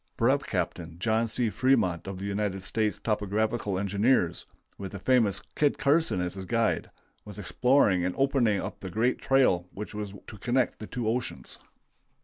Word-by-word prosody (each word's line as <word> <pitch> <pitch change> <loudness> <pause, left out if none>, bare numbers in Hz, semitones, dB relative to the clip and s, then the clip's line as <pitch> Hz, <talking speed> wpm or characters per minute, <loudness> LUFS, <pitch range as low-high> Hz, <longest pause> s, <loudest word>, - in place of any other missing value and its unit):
Brev. - - +2
Capt. - - -1 0.2
John 110 +4 +1
C. 115 0 0
Fremont 95 -7 +1
of 95 -1 -5
the 95 - -6
United 100 -1 -2
States 110 +1 0
Topographical 105 -1 -1
Engineers, 100 -2 +1 0.3
with 95 0 -7
the 100 - -5
famous 115 -1 +2
Kit 145 -1 +2
Carson 150 - +2
as 90 0 -2
his 95 0 -6
guide, 115 +3 0 0.3
was 105 -1 -11
exploring 105 -2 +2
and 90 0 -1
opening 135 -7 +2
up - - -5
the 95 - -6
great 115 +7 +1
trail 125 -10 +3
which 105 +2 -7
was 105 -1 -5
to 105 - -11
connect 120 +4 0
the 110 - -7
two 120 -2 -3
oceans. 115 - -3
105 Hz, 165 wpm, -28 LUFS, 95-120 Hz, 0.3 s, trail